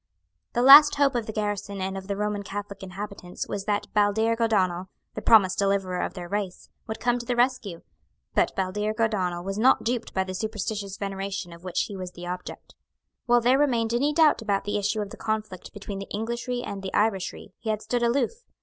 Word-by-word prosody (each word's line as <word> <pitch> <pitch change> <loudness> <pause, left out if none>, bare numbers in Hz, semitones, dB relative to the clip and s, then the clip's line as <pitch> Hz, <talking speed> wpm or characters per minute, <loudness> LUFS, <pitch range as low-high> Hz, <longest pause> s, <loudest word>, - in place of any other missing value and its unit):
The 240 - +1
last 290 +3 +10
hope 280 -1 +3
of 235 -3 -2
the - - -3
garrison 205 -2 -3
and 190 +1 -3
of 190 0 -7
the 200 -1 -2
Roman 210 0 -1
Catholic 200 0 -6
inhabitants 190 -1 -6
was 200 -1 -4
that 205 -1 0
Baldearg 220 +2 +2
O'Donnel, 185 -5 +1 0.3
the - - -5
promised 195 -5 +5
deliverer 195 -2 +1
of - - -3
their 175 -2 -6
race, 200 -1 -4 0.2
would 220 - -5
come 245 0 +1
to 240 - -7
the 245 - 0
rescue. 240 -8 0 0.5
But - - +2
Baldearg 210 +3 -2
O'Donnel 185 -6 0
was 195 +2 -3
not 255 +4 +4
duped 240 0 -2
by 190 - +2
the 185 0 -6
superstitious 210 -1 -3
veneration 195 -2 -4
of 170 +1 -14
which 180 -2 -1
he 205 - -4
was 185 -1 -6
the 175 - -9
object. 180 +1 -7 0.5
While 240 0 +5
there 255 +3 +4
remained 235 -6 +1
any 280 +5 +2
doubt 305 -4 +4
about 200 -3 0
the 205 0 -1
issue 205 +1 0
of 205 -1 -5
the - - -9
conflict 215 -4 -4
between 200 -1 -7
the 195 - -8
Englishry 235 +3 -3
and 200 -1 -5
the 195 - -4
Irishry, 205 -3 -1
he 225 - -5
had 215 0 -1
stood 240 +2 -1
aloof. 240 +2 +2
205 Hz, 205 wpm, -26 LUFS, 195-230 Hz, 0.5 s, last